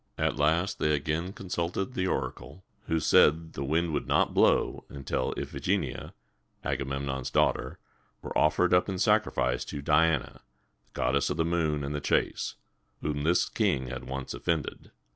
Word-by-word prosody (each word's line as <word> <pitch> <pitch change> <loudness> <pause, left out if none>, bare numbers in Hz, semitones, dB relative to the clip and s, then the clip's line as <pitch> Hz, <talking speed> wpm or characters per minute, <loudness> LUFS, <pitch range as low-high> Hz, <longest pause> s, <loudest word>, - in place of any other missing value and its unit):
At - - 0
last 80 +6 +1
they 75 0 +2
again 80 +5 -2
consulted 95 +3 -3
the 95 -4 -1
oracle, 95 0 -4 0.2
who 80 - +1
said 75 -1 +6
that 80 0 -12
the 70 - -4
wind 80 +4 0
would 70 - -2
not - - +2
blow - - +3
until 70 -2 -2
Iph - - -5
i - - -5
ge - - +2
ni´a, - - -6 0.5
Agamemnon's 70 -1 -2
daughter, - - +1 0.5
were - - -6
offered 90 +4 +3
up 90 +2 +4
in 95 - -2
sacrifice 105 - +2
to 75 - -6
Di 75 +3 +4
an´a, 80 -4 -2 0.5
goddess 70 +2 +1
of 75 - -2
the 80 - +1
moon 80 -3 0
and 70 +1 -3
the 75 - -3
chase, - - 0 0.5
whom 75 -1 -1
this 85 +4 +2
king 65 -1 0
had 65 +1 -6
once 65 0 -5
offended. 75 +4 -3
75 Hz, 170 wpm, -28 LUFS, 70-85 Hz, 0.5 s, said